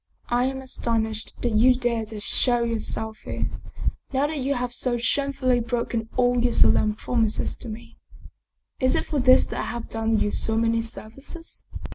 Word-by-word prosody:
" - - -39 0.2
I - - +2
am 265 0 -2
astonished 225 -3 -2
that 240 - +1
you 250 +4 +5
dare 235 -3 -1
to 215 -1 -7
show 240 +3 +3
yourself 220 -1 -2
here, - - -4 0.6
now 275 +1 +2
that 300 0 -2
you 275 +2 0
have 245 0 -2
so 245 0 0
shamefully 255 0 +1
broken 235 -1 -2
all 245 -1 +3
your 245 -1 +2
solemn 215 0 +4
prom 230 0 +1
ises 210 - -2
to 240 - -5
me. 230 +2 -9 0.8
Is 260 0 +2
it - - 0
for 295 - -1
this 255 0 +6
that - - -5
I - - -2
have 235 -1 -5
done 225 0 0
you 205 - +1
so 220 0 -1
many 230 0 +2
services? 270 +9 -9
240 Hz, 185 wpm, -25 LUFS, 225-255 Hz, 0.8 s, this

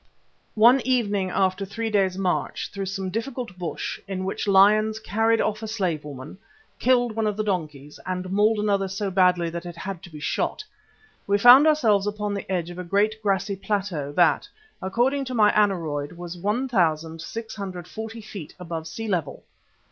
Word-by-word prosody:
One 240 +5 +6
evening, 205 -7 +1
after 185 +1 0
three 225 +3 -4
days' 190 -3 +1
march 185 -2 -2
through 195 -1 -4
some 190 -1 -3
difficult 235 -1 -4
bush 175 -2 -4
in 190 -1 -3
which 195 - -3
lions 210 +2 +5
carried 225 +1 +1
off 215 0 -1
a 220 - -5
slave 185 -8 -2
woman, 145 +4 -9 0.4
killed 245 -2 +3
one 220 -1 0
of 210 -1 -2
the 215 - 0
donkeys 155 -8 -4
and 185 0 -3
mauled 210 +3 +3
another 200 -2 +1
so 195 +1 -3
badly 180 -2 +3
that 170 0 -5
it 175 -1 -8
had 185 0 -6
to 190 - -11
be 155 -2 -10
shot, 150 - -2 0.6
we 200 0 +3
found 245 +8 +8
ourselves 220 -10 +3
upon 210 0 -2
the 200 -1 -5
edge 175 -2 -1
of 175 - -9
a - - -4
great 210 +4 +1
grassy 200 -1 0
plateau 195 -7 -2
that, - - +3 0.3
according 245 +9 +1
to 255 -1 -5
my 210 -2 +5
aneroid, 165 -8 0
was 175 0 -7
1,640 195 +1 -3
feet 200 -7 -9
above 165 -2 -5
sea 225 +8 -6
level. 180 -7 -2
195 Hz, 170 wpm, -24 LUFS, 180-220 Hz, 0.6 s, found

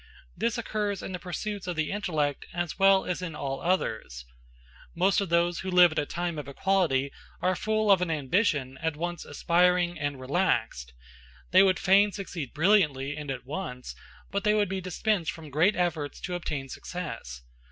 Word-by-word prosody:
This 230 +1 -1
occurs 210 -4 -2
in - - -5
the 180 - -4
pursuits 190 +2 -5
of 180 - -2
the 155 -1 -1
intellect 155 -8 -1
as 175 +1 -3
well 195 0 +5
as 180 0 -2
in 165 -4 -5
all 135 -2 -4
others. 110 - -1 0.7
Most 190 +4 +3
of 195 - -3
those 170 0 +2
who 190 - -4
live 180 -2 +6
at 155 - -1
a 145 - -2
time 175 -2 -3
of 145 - -7
equality 140 -4 +1 0.3
are 185 0 +1
full 215 +1 +1
of 190 -2 +5
an 180 - 0
ambition 145 - 0
at 160 -2 -1
once 175 +2 -4
aspiring 175 +2 +2
and 145 -2 -2
relaxed: 130 - -1 0.6
they - - +7
would 190 -2 +4
fain 200 +2 +4
succeed 175 -9 -6
brilliantly 150 -6 +2
and 150 -1 -7
at 130 -2 -5
once, 135 -4 -5 0.4
but 200 0 -1
they 210 0 +3
would 205 -2 +2
be 190 0 -3
dispensed 185 -1 -1
from 160 -3 -11
great 165 +9 +3
efforts 165 -5 -1
to 180 - -4
obtain 150 -6 -3
success. 130 - -7
175 Hz, 180 wpm, -28 LUFS, 145-190 Hz, 0.7 s, they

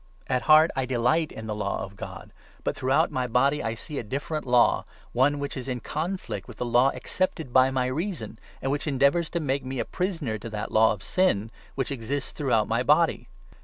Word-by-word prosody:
At 125 -1 0
heart 155 +2 +7
I 130 -1 -1
delight 130 +6 +1
in 110 - -8
the 110 - -3
Law 105 -2 -2
of 100 0 -9
God; - - -9 0.3
but - - -1
throughout 130 +1 +2
22, - - -14
my 130 -1 0
body 135 +5 +2
I 115 0 -2
see 145 +4 -6
a - - -4
different 140 +6 -4
law, 125 -1 +4 0.3
one 135 +4 +3
which 140 0 -4
is 130 -1 -6
in 125 -2 -2
conflict 155 - -4
with - - -11
the 125 - -2
law 120 +3 +4
accepted 160 -8 -2
by 130 0 +6
my 130 -1 0
reason, 130 - -3 0.2
and 135 - 0
which 145 +2 -2
endeavours 140 +4 +2
to 170 - -2
make 140 -3 -1
me 130 +1 -5
a 115 - -1
prisoner 165 - -2
to 115 - -7
that 105 -1 -5
law 110 +1 +5
of 105 -3 -5
Sin 115 - +1 0.2
which 135 -1 -2
exists 135 +2 -3
throughout 120 -8 +1
my 115 +2 +1
body. 150 +5 +3
130 Hz, 215 wpm, -26 LUFS, 115-150 Hz, 0.3 s, heart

